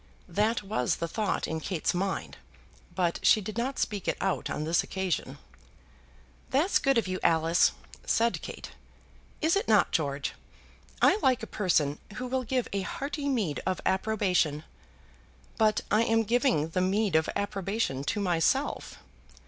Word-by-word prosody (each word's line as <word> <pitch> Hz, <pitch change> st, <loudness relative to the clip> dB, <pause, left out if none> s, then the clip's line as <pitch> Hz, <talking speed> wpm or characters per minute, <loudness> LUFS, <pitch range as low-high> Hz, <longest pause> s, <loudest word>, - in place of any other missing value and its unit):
That 210 Hz, +5 st, 0 dB
was 190 Hz, -, 0 dB
the 170 Hz, -, -3 dB
thought 215 Hz, +5 st, -1 dB
in 160 Hz, -, -2 dB
Kate's 170 Hz, +1 st, -1 dB
mind, 190 Hz, +2 st, -2 dB, 0.6 s
but 175 Hz, -2 st, 0 dB
she -, -, +5 dB
did 210 Hz, +1 st, -6 dB
not 255 Hz, +4 st, -2 dB
speak 205 Hz, -3 st, -2 dB
it -, -, 0 dB
out 195 Hz, -2 st, -1 dB
on 150 Hz, -, -3 dB
this 165 Hz, +2 st, +2 dB
occasion. 190 Hz, -2 st, -3 dB, 1.1 s
"That's 300 Hz, +9 st, +3 dB
good 275 Hz, -2 st, +2 dB
of 230 Hz, -, +1 dB
you, 185 Hz, 0 st, -2 dB
Alice," 165 Hz, +1 st, +3 dB, 0.3 s
said 230 Hz, +1 st, +1 dB
Kate. -, -, -8 dB, 0.7 s
"Is 320 Hz, +3 st, +3 dB
it 400 Hz, -, 0 dB
not, 215 Hz, -4 st, +4 dB
George? 140 Hz, -3 st, -1 dB, 0.7 s
I -, -, +5 dB
like 255 Hz, -3 st, +2 dB
a -, -, -8 dB
person 150 Hz, -6 st, +2 dB, 0.2 s
who 255 Hz, -, -4 dB
will 260 Hz, +1 st, -1 dB
give 250 Hz, 0 st, -1 dB
a 200 Hz, -, 0 dB
hearty 285 Hz, +8 st, -3 dB
meed 210 Hz, -, -1 dB
of 185 Hz, -1 st, -1 dB
approbation." 190 Hz, -7 st, +1 dB, 1.0 s
"But 215 Hz, -1 st, +3 dB
I 215 Hz, -, +4 dB
am 225 Hz, -1 st, +2 dB
giving 235 Hz, -, +1 dB
the 180 Hz, +3 st, -1 dB
meed 195 Hz, 0 st, +1 dB
of 160 Hz, 0 st, +3 dB
approbation 200 Hz, -7 st, -2 dB
to 205 Hz, +7 st, -1 dB
myself." 175 Hz, -5 st, 0 dB
200 Hz, 155 wpm, -28 LUFS, 170-230 Hz, 1.1 s, she